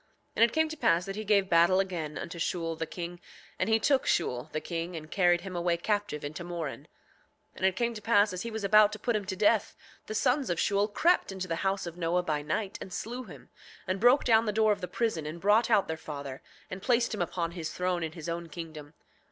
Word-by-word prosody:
7:17 - - -42
And 230 - +7
it 235 - -4
came 315 0 +3
to 315 - -5
pass 170 - +2
that 195 0 -5
he 215 - -4
gave 200 -2 +3
battle 170 +2 +5
again 170 -6 -2
unto 170 0 -6
Shule, 165 -1 -1
the 165 0 -4
king; 175 0 -7 0.4
and 185 - 0
he 220 - +5
took 270 +3 +2
Shule, 125 -4 0
the 155 - -2
king, 170 +2 -4
and 155 -1 -8
carried 175 -2 +3
him 190 -2 -7
away 175 0 +1
captive 205 -5 -2
into 155 +4 -6
Moron. 170 -5 -5 0.7
7:18 - - -23
And 190 - -1
it 190 - 0
came 235 +3 0
to 215 - -8
pass 205 -2 +3
as 185 - -4
he 230 - -4
was 220 -2 -5
about 210 +1 +6
to - - -5
put 230 +2 -1
him 210 -2 -1
to 190 0 -3
death, 210 +2 +2 0.3
the 215 - -4
sons 260 +2 +1
of 175 - -1
Shule 200 0 +2
crept 335 - +2
into 190 -1 -5
the 165 -1 -2
house 195 +1 -1
of 170 0 -7
Noah 175 +1 0
by 150 -3 -1
night 190 +7 -3
and 190 - -8
slew 245 +7 -5
him, - - -13 0.4
and 190 0 -2
broke 245 +6 +5
down 225 -1 +4
the - - +2
door 215 0 +3
of 205 -1 -1
the 180 - -3
prison 180 -11 -1
and 160 +3 -6
brought 210 +5 +3
out 200 - +4
their 160 - -3
father, 140 -4 -7 0.3
and 185 - -6
placed 235 +1 +2
him 210 - -3
upon 170 0 -2
his 165 -3 -5
throne 180 -1 -1
in 160 -1 -3
his 165 -1 -8
own 170 0 -4
kingdom. 155 -2 -9
185 Hz, 250 wpm, -29 LUFS, 165-215 Hz, 0.7 s, And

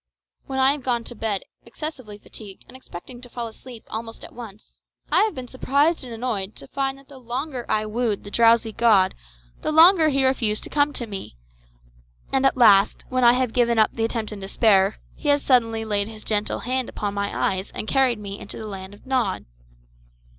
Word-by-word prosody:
When 265 - -4
I 265 +1 +5
have 290 0 -3
gone 240 -2 -1
to 240 - -7
bed 215 -3 -2 0.2
excessively 245 -4 -7
fatigued 205 -1 -11
and 255 - -14
expecting 245 0 -10
to 245 - -9
fall 240 0 -5
asleep 230 +1 -12
almost 225 +1 -6
at - - -14
once, 220 -3 -12 0.3
I - - +5
have 440 - -3
been 255 -1 -6
surprised 285 +5 +1
and 250 - -9
annoyed 225 -4 -3
to 135 - -10
find 270 0 -2
that 275 0 -19
the 275 -2 -13
longer 255 +1 -5
I 215 0 +1
wooed 220 -1 -1
the 205 - -9
drowsy 230 0 +4
god 210 -4 +4 0.5
the - - -1
longer 325 +1 +7
he 270 -2 +2
refused 225 -5 +2
to - - -8
come 290 0 +2
to 240 - -3
me; 195 - -7 1.0
and 270 0 +4
at 270 - -1
last, 210 -5 +5
when 255 0 0
I 240 0 +7
have 250 -2 0
given 235 -2 +2
up 220 -1 +4
the 225 - -2
attempt 225 -2 -3
in 210 - -7
despair, 195 0 +2 0.2
he 295 - -3
has 285 0 +3
suddenly 225 -4 +2
laid 205 -1 +1
his 220 -1 -10
gentle 210 -1 -1
hand 255 +1 -1
upon 205 -1 -4
my 200 0 -1
eyes 190 +1 -5
and 215 - -4
carried 260 -2 +2
me 200 -1 -7
into 200 - -7
the 220 - -7
land 195 -1 -8
of - - -21
Nod. 255 -8 -1
235 Hz, 205 wpm, -23 LUFS, 210-260 Hz, 1.0 s, longer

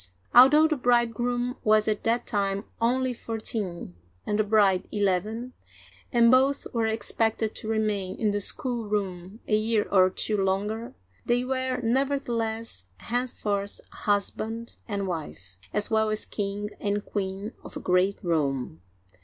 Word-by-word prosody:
Although 280 +6 +8
the 310 -1 0
bridegroom 245 0 +1
was 215 0 +4
at 215 -1 0
that 230 +2 +1
time 200 -2 -1 0.2
only 255 +2 +1
fourteen 215 - -4 0.3
and 210 0 -1
the - - +4
bride 200 -3 +3
eleven, 210 +5 -1 0.6
and 235 -1 +5
both 265 +2 +3
were 230 -2 +1
expected 220 0 0
to - - -7
remain 210 -4 -1
in 215 -2 +2
the 205 0 -1
schoolroom 205 -5 -2
a 215 - +3
year 215 0 +1
or 185 -2 +6
two 210 +3 -1
longer, 210 +5 -2 0.3
they 245 +1 +1
were 260 -1 -1
nevertheless 230 - -1
henceforth 210 -4 -2
husband 220 +3 -2
and 200 -3 -2
wife, 145 - -6
as 210 +1 +1
well 220 0 +3
as 215 0 -1
king 205 0 -3
and 205 0 -1
queen 195 +2 -4
of - - -8
a - - -5
great 185 +2 +2
realm. 135 - -1
215 Hz, 135 wpm, -27 LUFS, 200-235 Hz, 0.6 s, Although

